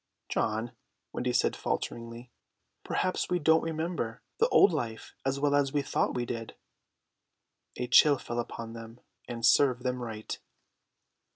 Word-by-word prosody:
"John," 110 +2 -1 0.4
Wendy - - -1
said - - +2
falteringly, 115 +1 -4 0.5
"perhaps 185 - -1
we 180 - +2
don't 160 0 +4
remember 160 -7 -3 0.2
the 465 +3 +4
old 190 - +6
life 115 -7 -4
as 135 +1 -1
well 145 0 +2
as 140 -1 +2
we 145 -1 +1
thought - - 0
we 120 -1 -1
did." 115 -1 -5 1.2
A 125 - -1
chill 140 +4 +6
fell 120 -1 -4
upon 115 -1 -5
them; 115 +1 -10 0.3
and 115 -1 -3
serve 125 -3 +4
them 125 -1 -1
right. 110 -2 -5
125 Hz, 145 wpm, -29 LUFS, 115-145 Hz, 1.2 s, old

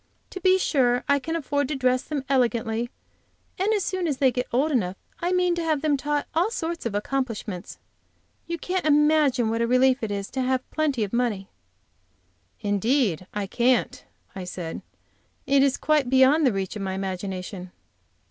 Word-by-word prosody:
To 375 - -6
be 370 0 +5
sure, 250 -8 +2
I 280 0 +3
can 325 +4 -4
afford 285 -3 -1
to 300 - -2
dress 255 -1 +2
them 285 -3 -4
elegantly, 235 -3 0 0.7
and 395 +3 +2
as 415 -4 +1
soon 370 -3 -1
as 290 -4 -1
they 260 -1 +4
get 250 0 -2
old 275 +6 +1
enough 195 -8 0 0.2
I 350 +1 -1
mean 360 -1 +2
to 345 -1 -2
have 310 -3 0
them 300 -2 +3
taught 290 +1 -1
all 340 +6 +2
sorts 335 - -3
of 205 - -5
accomplishments. 215 -5 -3 0.7
You 340 - -3
can't 365 +3 -2
imagine 295 -6 +3
what 230 +1 -1
a 235 - +2
relief 255 +2 +3
it 220 - -2
is 200 -1 -4
to 265 - -2
have 260 0 0
plenty 290 -7 0
of 200 - -5
money!" 230 -6 -1 1.1
"Indeed 205 - +1
I 205 -1 -3
can't!" 245 +5 +1 0.3
I 190 - -5
said; 175 -2 -6 0.6
"it 275 0 +4
is 275 -1 +3
quite 300 -5 +1
beyond 265 +3 +5
the - - +3
reach 195 -1 -3
of 210 - -5
my 190 -1 -2
imagination." 185 -1 -5
260 Hz, 180 wpm, -25 LUFS, 215-300 Hz, 1.1 s, be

